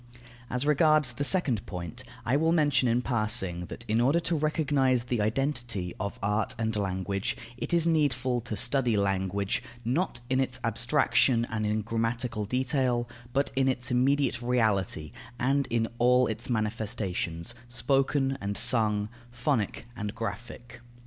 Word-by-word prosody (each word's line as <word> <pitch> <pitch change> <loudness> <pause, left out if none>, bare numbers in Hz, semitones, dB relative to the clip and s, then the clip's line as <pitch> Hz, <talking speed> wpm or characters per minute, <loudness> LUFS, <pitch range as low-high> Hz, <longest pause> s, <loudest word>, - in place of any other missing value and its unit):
As 125 +2 -1
regards 150 -2 +4
the 120 +4 -3
second 140 - +2
point, 85 -3 -6 0.2
I 125 - +2
will 160 +3 +3
mention 145 -6 +3
in 120 +1 +2
passing 100 -8 0
that, 115 - -8
in 110 +2 +2
order 140 +7 +3
to 165 0 -1
recognize 145 -5 +1
the 120 -2 -1
identity 120 -5 -1
of 100 +1 -3
art 105 +1 0
and 110 -1 -1
language, 100 0 -2 0.2
it - - -5
is 170 -1 +3
needful 130 -6 +1
to 110 -2 -5
study 120 -1 +2
language, 100 0 0 0.2
not 140 +9 0
in 130 +1 +1
its 130 -1 -1
abstraction 120 +1 +2
and 110 -1 -1
in 105 +1 0
grammatical 115 0 -1
detail, 125 0 0 0.2
but 140 +3 0
in 135 0 +2
its 125 -1 -1
immediate 130 +1 +2
reality, 110 -10 0 0.3
and 135 +2 +1
in 115 -1 +1
all 125 +1 +5
its 110 - -3
manifestations, 105 -4 -2
spoken 135 +3 +1
and 100 +1 -2
sung, 110 -3 +2 0.2
phonic 120 -3 -1
and 105 0 -4
graphic. 115 +2 -6
120 Hz, 145 wpm, -28 LUFS, 105-135 Hz, 0.3 s, all